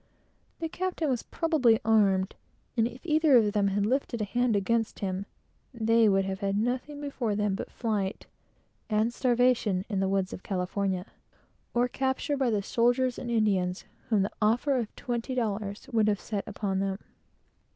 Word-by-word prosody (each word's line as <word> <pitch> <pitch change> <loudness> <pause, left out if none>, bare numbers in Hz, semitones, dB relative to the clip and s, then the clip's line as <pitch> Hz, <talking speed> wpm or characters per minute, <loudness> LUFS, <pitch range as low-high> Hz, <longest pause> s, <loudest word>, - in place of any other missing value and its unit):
The 330 - -2
captain 345 -3 -2
was 245 - 0
probably 285 -10 +2
armed, 200 -4 +3 0.4
and 230 -1 +3
if 245 +6 -11
either 310 -4 +5
of 210 -3 +3
them 205 -2 +2
had 200 +1 +1
lifted 250 0 0
a - - 0
hand 240 +2 +1
against 225 +3 0
him, 195 0 -3 0.5
they 225 -1 +4
would 195 -1 +2
have 190 0 -3
had 200 -1 0
nothing 255 +6 -2
before 270 -7 -2
them 210 -1 0
but 195 - -4
flight, 210 -4 -2 0.6
and 220 +2 +1
starvation 240 -7 +2
in 200 -3 -1
the 190 0 +1
woods 195 -1 0
of - - -7
California, 185 0 -2 0.7
or 240 +1 +3
capture 265 +3 -1
by 265 -3 +1
the 210 -3 0
soldiers 245 +3 +1
and 240 - -5
Indian 215 -4 +3
blood 180 - 0
hounds, 180 +2 -6 0.2
whom 215 -4 +3
the 200 - -2
offer 240 +6 +2
of 235 -4 -2
twenty 240 +1 -3
dollars 210 -2 -2
would 220 -2 +3
have 205 -2 +1
set 205 -2 -4
upon 195 -2 -2
them. 195 0 -1
220 Hz, 175 wpm, -28 LUFS, 200-245 Hz, 0.7 s, either